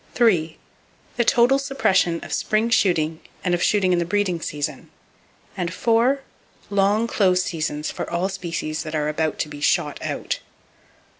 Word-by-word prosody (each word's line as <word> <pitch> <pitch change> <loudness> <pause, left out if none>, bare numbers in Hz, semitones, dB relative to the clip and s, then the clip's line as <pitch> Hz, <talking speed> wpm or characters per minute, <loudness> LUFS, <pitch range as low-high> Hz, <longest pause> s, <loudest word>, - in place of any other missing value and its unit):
—The 175 -10 +2 0.7
total 245 +4 +4
suppression 195 -11 +1
of - - -6
spring 220 +2 +1
shooting 165 -7 +2 0.2
and 180 - +1
of 175 - 0
shooting 190 -3 +3
in 175 - +2
the - - +1
breeding 180 -1 0
season, 145 -1 -4 0.7
and 180 -3 -2 1.0
—Long 200 +3 +3
close 185 -5 +2
seasons 155 -3 -3
for - - -5
all 170 +2 0
species 170 -5 -4
that 155 0 -5
are 150 0 0
about 155 0 -1
to - - -1
be 145 -1 -9
"shot 140 - +1
out." - - -3
175 Hz, 145 wpm, -23 LUFS, 160-205 Hz, 1.0 s, total